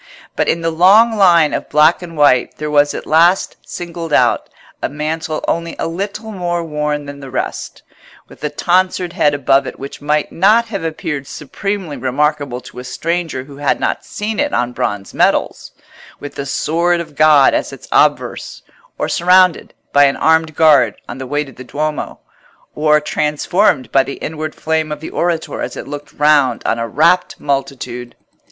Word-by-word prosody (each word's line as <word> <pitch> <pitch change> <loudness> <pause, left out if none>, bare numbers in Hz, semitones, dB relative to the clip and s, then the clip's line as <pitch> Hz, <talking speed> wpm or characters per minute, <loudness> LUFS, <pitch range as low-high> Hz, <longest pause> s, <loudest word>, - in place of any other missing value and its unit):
But - - 0
in 165 - 0
the 165 0 0
long 205 +8 +5
line 170 -6 +4
of - - -3
black 150 +4 +4
and 165 -2 -9
white 135 -4 +3
there 150 0 -4
was 145 0 +3
at - - -6
last 170 +4 +3
singled 170 -2 -7
out - - +2 0.3
a - - -1
mantle 155 +2 -3
only 170 0 -2
a - - -2
little 200 +6 -5
more 175 -3 -2
worn 150 -2 -3
than 140 0 -9
the 135 -1 -9
rest, 130 - -5 0.4
with - - -17
a 150 - 0
tonsured 180 +3 0
head 145 -1 +2
above 135 0 +2
it - - -7
which 140 +1 -9
might 150 +1 0
not 215 +6 +3
have 195 -6 -4
appeared 155 -3 -4
supremely 185 +2 -5
remarkable 140 -1 -1
to 125 - -11
a - - -7
stranger 165 +1 -3
who 140 0 -13
had 145 -1 0
not - - -1
seen 210 +1 -4
it 290 0 0
on 125 0 -1
bronze 105 -4 -3
medals, - - 0 0.5
with 145 - -8
the 140 - -5
sword 170 +5 0
of 170 -3 -7
God 150 -2 +5
as - - -1
its - - -12
obverse; - - 0 0.3
or - - -1
surrounded 180 0 +3 0.2
by 145 0 +6
an 140 - +2
armed 160 -1 +2
guard 155 -4 +4
on 120 - -7
the 130 - -6
way 145 +3 -1
to 135 - -12
the 130 +1 -11
Duomo; 150 +4 -4 0.5
or 150 0 +3
transfigured 150 +1 0
by 135 - +5
the 140 - -5
inward 155 0 -5
flame 160 -1 -1
of 150 - -4
the 160 - -8
orator 170 -2 -2
as - - -5
it - - -7
looked 145 0 -8
round 145 -5 +2
on 115 - 0
a 115 - -2
rapt 170 - +2
multitude. 135 -3 -4
150 Hz, 180 wpm, -16 LUFS, 140-170 Hz, 0.5 s, by